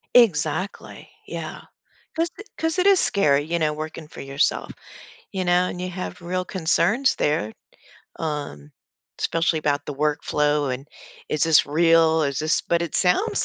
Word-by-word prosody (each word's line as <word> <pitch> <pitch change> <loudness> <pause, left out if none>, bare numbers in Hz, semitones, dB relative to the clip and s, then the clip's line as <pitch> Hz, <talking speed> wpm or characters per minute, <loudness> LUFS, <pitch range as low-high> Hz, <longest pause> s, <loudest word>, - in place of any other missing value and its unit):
Exactly, 185 -4 +1 0.2
yeah. - - -6 0.5
'Cause 330 +1 0 0.3
'cause 325 +3 -1
it 380 - +3
is 390 -2 +6
scary, 145 -8 +2
you 170 +2 -2
know, 155 -1 +1
working 155 0 -7
for - - -10
yourself, 135 +1 0 0.6
you 190 -2 -2
know, 180 +1 +3
and 180 - -6
you 185 - -3
have 185 0 -6
real 185 +1 -2
concerns 190 +9 +1
there, 110 -8 0 0.7
um, 145 - -4 0.5
especially 165 -1 +1
about 145 -1 0
the 145 - -4
work 150 +2 0
flow 150 -1 +1
and 130 +2 -4 0.4
is 150 - -1
this 160 -2 +5
real, 160 +1 +4
is 140 -3 -1
this 155 +1 +1
but 170 - 0
it 170 - -5
sounds 190 - +1
160 Hz, 155 wpm, -23 LUFS, 150-180 Hz, 0.7 s, is